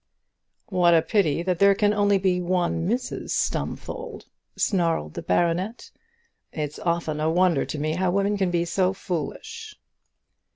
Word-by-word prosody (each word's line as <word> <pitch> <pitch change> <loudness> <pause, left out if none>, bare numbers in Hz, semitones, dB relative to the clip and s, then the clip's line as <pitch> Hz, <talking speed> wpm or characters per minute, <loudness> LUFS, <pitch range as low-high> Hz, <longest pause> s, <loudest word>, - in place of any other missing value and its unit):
"What 175 -3 +4
a 160 - +4
pity 170 -6 +1
that 180 -1 -1
there 200 0 +6
can 205 0 +2
be - - -1
only 195 -3 +2
one 175 -1 0
Mrs 245 +3 -3
Stumfold," 470 -3 -3 0.3
snarled 165 - 0
the - - -5
baronet; 175 - -1 0.6
"it's 150 -1 -4
often 170 -3 -1
a 155 +1 +1
wonder 175 -3 +2
to - - -5
me 155 +1 -1
how 185 +2 0
women 200 +2 +1
can 190 -2 0
be 170 -1 0
so 185 +2 +1
foolish." 195 - -5
180 Hz, 150 wpm, -24 LUFS, 165-200 Hz, 0.6 s, there